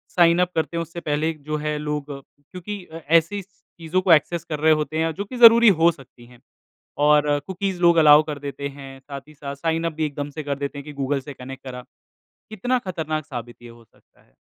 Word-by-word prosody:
Sign 170 -1 +5
up 180 0 0
करते 160 +1 -1
है 170 - 0
उससे 165 +1 -7
पहले 155 +1 -1
जो 155 0 -5
है 150 0 -2
लोग 150 -1 -4 0.3
क्योंकि 185 +6 -8
ऐसी 165 +5 +1
चीजों 185 -3 -5
को 185 -2 +2
एक्सेस 165 +2 +1
कर 150 -2 -5
रहे 155 +1 +5
होते 150 +2 -4
है 165 0 -1
जो 200 +5 -5
की 245 +5 -8
ज़रूरी 235 0 +8
हो 170 - +6
सकती 130 -5 -17
है 120 0 -18 0.7
और 150 0 +5 0.2
कुकीज़ 190 -1 -3
लोग 170 -1 +5
अलाउ 150 -1 +8
कर 150 -2 -6
देते 140 0 -5
हैं, 135 -1 -11
साथ 140 +1 -9
ही - - -15
साथ 140 -1 -7
साइन 165 +2 -1
अप 165 - -2
भी 155 0 -2
एकदम 145 0 -5
से 155 +1 -6
कर 140 -1 -3
देते 140 0 -4
हैं 140 - -10
कि 150 - -9
गूगल 140 0 -2
से 145 +2 -9
कनेक्ट 135 +1 -10
करा, 125 -2 -8 0.7
कितना 245 +5 -1
खतरनाक 155 -4 -3
साबित 120 -3 -8
ये 120 - -11
हो 115 0 -17
सकता - - -30
है। - - -33
155 Hz, 225 wpm, -22 LUFS, 140-170 Hz, 0.7 s, ज़रूरी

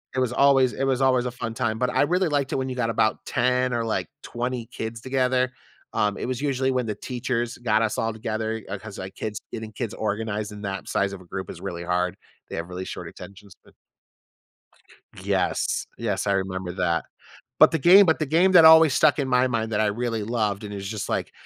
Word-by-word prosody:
it - - +1
was 125 -2 0
always 135 -2 +4
it 135 - -3
was 135 -1 +1
always 130 -2 +3
a 125 - -2
fun 115 -2 -5
time, 115 -4 -1
but 125 +1 +1
I - - +2
really 180 +5 +1
liked 145 -3 0
it - - 0
when 130 0 -2
you 130 - -4
got 115 -2 0
about 110 -1 0
10 125 0 +1
or, 115 -1 0
like, 110 - -1 0.2
20 120 -1 -4
kids 110 0 -6
together, 130 -1 +1 0.4
um, 105 -1 0
it - - -4
was 130 0 -3
usually 135 -2 0
when 130 -2 0
the 105 - -2
teachers 120 0 -3
got 110 -3 +2
us 110 -2 0
all 115 0 -1
together, 110 0 -3
uh, 100 - -3
'cause, 105 0 -10
like, 95 +1 -7
kids 105 -2 -4
getting 110 -1 -6
kids 115 0 -5
organized 110 0 -3
in 105 - -9
that 100 -1 -4
size 100 0 0
of 95 - -8
a - - -15
group 95 +2 -6
is - - -9
really 85 0 -5
hard. 90 +1 0 0.3
They - - -6
have 85 +2 -5
really 90 +1 -5
short - - -7
attentions 100 -1 -12
sp - - -21 1.5
Yes. - - 0
Yes, 105 -4 -2
I 100 - +2
remember 95 -2 -2
that. 85 -3 0 0.6
But - - +8
the 160 - 0
game 185 +7 +8
but 160 -2 +2
the 155 - 0
game 170 +6 +3
that 170 -3 +8
always 160 -2 +8
stuck 155 0 +4
in 140 -3 -1
my 125 0 +3
mind 115 -2 -2
that 105 - 0
I 110 - +3
really 115 +1 -2
loved 105 -2 -1
and 105 -1 -6
it - - -5
was 95 0 -6
just 105 -2 -4
like, - - -2
115 Hz, 230 wpm, -24 LUFS, 105-130 Hz, 1.5 s, But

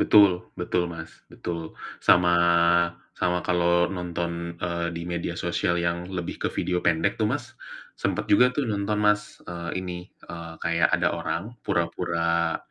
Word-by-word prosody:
Betul, 100 -4 +5
betul, 90 0 0
Mas, 80 -1 -7 0.2
betul. 85 -2 -6 0.2
Sama, 90 0 +5 0.8
sama 90 0 0
kalau 85 0 +3
nonton, 85 -1 -4
eee, 85 0 -2
di 85 - -4
media 85 -1 -3
sosial 85 - 0
yang 85 +1 -1
lebih 90 -3 -4
ke - - +1
video 90 -1 0
pendek 80 -1 +1
tuh, - - +3
Mas, - - -3 0.5
sempat - - 0
juga 125 +5 +7
tuh 145 - +1
nonton, 105 -2 -1
Mas, 105 0 +1
eee, 85 -1 -5
ini, 90 -1 -4 0.3
eee, 85 -1 -8
kayak 85 0 +3
ada - - +2
orang 85 - -2 0.2
pura-pura, 85 -1 0
85 Hz, 145 wpm, -26 LUFS, 85-90 Hz, 0.8 s, juga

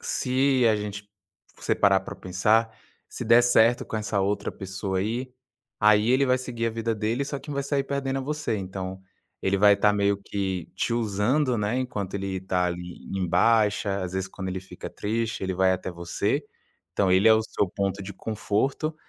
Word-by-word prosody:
se 130 -1 +1
a 110 - +3
gente 105 0 -6 0.5
você - - 0
parar 100 -1 +4
pra 95 - -8
pensar, 110 +5 +1 0.3
se - - -7
der 115 +2 +6
certo 120 0 +4
com - - -8
essa 105 -1 -1
outra 100 +2 -1
pessoa 95 0 -4
aí, 120 +6 -2 0.5
aí 105 +1 +5
ele 130 +2 +4
vai 130 0 +3
seguir 120 -2 -4
a - - 0
vida 115 0 -2
dele, 110 +5 -1
só 140 0 -4
quem 145 +2 -8
vai 140 0 -1
sair 140 0 -1
perdendo 135 -1 -2
é - - -5
você. 150 -5 -2
Então, 95 -1 -5 0.4
ele 95 +1 +1
vai 100 +1 +7
estar 105 +1 +3
meio 100 0 +2
que 95 -3 -3
te 115 - -1
usando, 120 +4 +1
né, 105 +3 0
enquanto 105 -7 -4
ele 95 -1 -3
tá 90 -1 0
ali 90 0 -6
em 95 -2 -1
baixa, 105 0 +2
às 90 0 -4
vezes, 95 0 -1
quando 95 0 -6
ele 95 0 -3
fica 95 - -9
triste, 115 +1 -2
ele 95 - -1
vai 95 +1 +3
até 95 0 -3
você. 90 - -2 0.5
Então, 95 0 +2
ele 95 +4 +5
é 110 - +8
o 110 - +2
seu 100 -3 -1
ponto 100 +1 -2
de 100 +1 -7
conforto, 115 +8 -1
105 Hz, 195 wpm, -26 LUFS, 95-120 Hz, 0.5 s, é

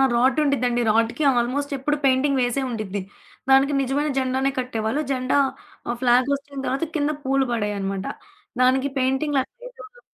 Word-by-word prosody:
రాడ్డుండిద్దండి. 255 -1 +2
రోడ్డుకి 230 +7 +1
ఆల్మోస్ట్ 280 +4 -1
ఎప్పుడు 295 +3 -1
పెయింటింగ్ 265 +1 +3
వేసే 245 +3 0
ఉండిద్ది. 205 -4 -4 0.5
దానికి 275 +2 +5
నిజమైన 285 +3 0
జెండానే 265 +1 0
కట్టేవాళ్ళు. 245 +2 -2
జెండా 255 +1 +1 0.5
ఆహ్, 240 - -2
ఫ్లాగ్ 250 +2 +3
హోస్టింగ్ 280 0 -1
వచ్చిన 270 - -3
తర్వాత 270 +6 -1
కింద 295 +1 +1
పూలు 270 -1 +2
పడేయనమాట. 200 -3 -2 0.6
దానికి 260 +2 +3
పెయింటింగ్ 265 +3 0
లాంటిదేదుండడు. 485 - -9
265 Hz, 135 wpm, -23 LUFS, 240-280 Hz, 0.6 s, దానికి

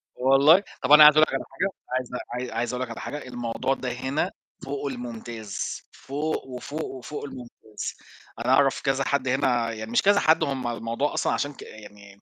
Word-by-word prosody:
والله 140 +8 +5 0.2
طَب - - -1
أنا 150 0 +11
عايز 150 0 +10
أقول - - +8
لك - - -6
على - - -2
حاجة 195 - -1 0.3
عايز 130 -1 -4 0.2
عاي 125 0 -4
عايز 120 +1 -1
أقول 125 +1 -2
لك 125 - -6
على 115 - -7
حاجة، 145 -2 -6
الموضوع 120 +1 -2
ده 130 -2 -4
هنا 130 +4 -2 0.3
فوق 140 +1 -4
المُمتاز، 120 -4 -5
فوق، 150 +3 -3
وفوق، 140 +4 -5
وفوق 135 +3 -7
المُمتاز. 120 -5 -8 0.4
أنا 130 - +2
أعرف 135 0 +3
كذا 135 -1 +1
حد 140 -1 0
هنا 125 -3 +1
يعني 110 0 -7
مش 120 - +3
كذا 200 +1 +4
حد 160 +1 +4
هم 135 -4 -2
الموضوع 115 +4 -2
أصلًا - - 0
عشان 145 0 -2
ك - - -14
يعني 100 -2 -13
130 Hz, 190 wpm, -25 LUFS, 120-145 Hz, 0.4 s, أنا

